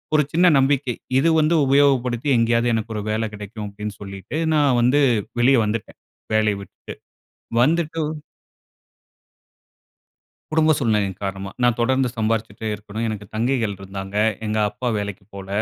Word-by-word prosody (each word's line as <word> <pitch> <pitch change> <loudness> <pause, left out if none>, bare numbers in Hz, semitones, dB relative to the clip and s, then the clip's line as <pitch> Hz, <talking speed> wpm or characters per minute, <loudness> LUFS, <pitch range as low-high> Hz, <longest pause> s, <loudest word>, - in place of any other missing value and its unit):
ஒரு 150 - +5
சின்ன 175 +3 +5
நம்பிக்கை. 135 -2 +2 0.2
"இது 165 +5 +3
வந்து 155 +2 +3
உபயோகப்படுத்தி 135 -2 +2
எங்கேயாவது 115 +1 +2
எனக்கு 110 0 -2
ஒரு 105 - -2
வேலை 110 +1 0
கெடைக்கும்" 105 0 -7
அப்படின்னு 105 +1 -6
சொல்லிட்டு 100 - -6 0.2
நான் 145 -5 +3
வந்து 130 +5 +3 0.4
வெளியே 130 +1 +5
வந்துட்டேன் 105 0 -4 0.3
வேலையை 110 -2 +2
விட்டுட்டு. - - -11 0.7
வந்துட்டு 165 +2 +1 2.5
குடும்ப 155 0 +3
சூழ்நிலையின் 105 -6 0
காரணமா. 95 0 -4
நான் 120 -1 +3
தொடர்ந்து 130 +2 +2
சம்பாதிச்சிட்டே 110 -1 -2
இருக்கணும். 105 +2 -5
எனக்கு 105 -2 -5
தங்கைகள் 115 -2 0
இருந்தாங்க. 95 +1 -7 0.3
எங்க 110 0 -1
அப்பா 110 +4 -5
வேலைக்கு 100 -2 -5
போல. 100 -1 -8
115 Hz, 130 wpm, -22 LUFS, 105-135 Hz, 2.5 s, ஒரு